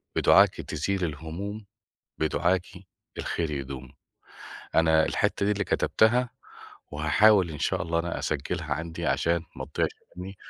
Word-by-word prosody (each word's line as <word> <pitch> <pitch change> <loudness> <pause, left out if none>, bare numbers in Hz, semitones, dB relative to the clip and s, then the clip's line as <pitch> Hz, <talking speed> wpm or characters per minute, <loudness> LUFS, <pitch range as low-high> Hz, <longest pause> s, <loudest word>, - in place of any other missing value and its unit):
بدُعاكِ - - +5
تزيل 100 -1 -2
الهموم، 85 +8 -6 0.5
بدُعاكِ 85 +3 +1 0.5
الخير 80 -2 -2
يدوم. 70 -2 -6 0.8
أنا 80 -1 +4
الحتّة 100 - 0
دي 105 - +3
اللي 105 0 -1
كتبتها، 120 +5 +2 0.6
وهاحاول 90 +5 +4
إن 75 - -7
شاء 90 +2 0
الله 85 -1 -1
أنا 85 0 -2
أسجّلها 75 +1 -2
عندي 80 +1 -5
عشان 85 0 +1
ما - - -5
تضيعش - - +2 0.3
مني. 95 +2 -7
85 Hz, 125 wpm, -27 LUFS, 80-95 Hz, 0.8 s, بدُعاكِ